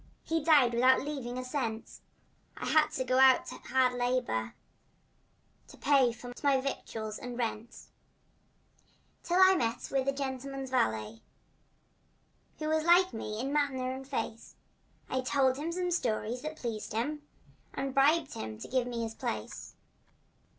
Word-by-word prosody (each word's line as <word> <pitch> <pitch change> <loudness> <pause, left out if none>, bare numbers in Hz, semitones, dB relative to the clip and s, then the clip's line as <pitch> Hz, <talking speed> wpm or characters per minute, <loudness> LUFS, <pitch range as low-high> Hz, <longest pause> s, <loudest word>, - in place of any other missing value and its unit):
He 325 -2 -1
died 290 -7 +5
without 255 +3 +4
leaving 270 -4 -5
a 255 - -3
cent, 255 -4 -4 0.6
And - - -4
I - - 0
had 310 -1 +5
to 260 - -1
go 255 0 +1
out 265 -1 +6
to - - -7
hard 260 -1 +3
labor 245 - -1 1.1
To - - -14
pay 270 -3 +4
for 245 +1 -9
my 280 -2 +3
victuals 220 -5 -5
and 245 -1 -7
rent; 230 -1 -4 1.4
Till 350 +2 0
I 375 0 +8
met 235 -10 -1
with 270 -1 0
a - - +4
gentleman's 270 -1 -5
valet 110 - 0 1.4
Who 310 - -4
was 315 0 +1
like 350 +2 +5
me 215 -1 -5
in 270 +4 -2
manner 265 -3 0
and 265 +1 -7
face, 230 -4 -5 0.5
And 260 - -1
I - - -13
told 260 0 +2
him 310 +4 -3
some 360 +1 -2
stories 240 -5 -1
that 310 +2 -6
pleased 225 -5 -5
him 295 +7 -2 0.5
And 270 -1 -3
bribed 290 +3 +3
him 110 -1 -6
to - - -8
give 250 -1 0
me 235 -1 -3
his 225 -1 -4
place. - - -5
260 Hz, 155 wpm, -30 LUFS, 235-285 Hz, 1.4 s, I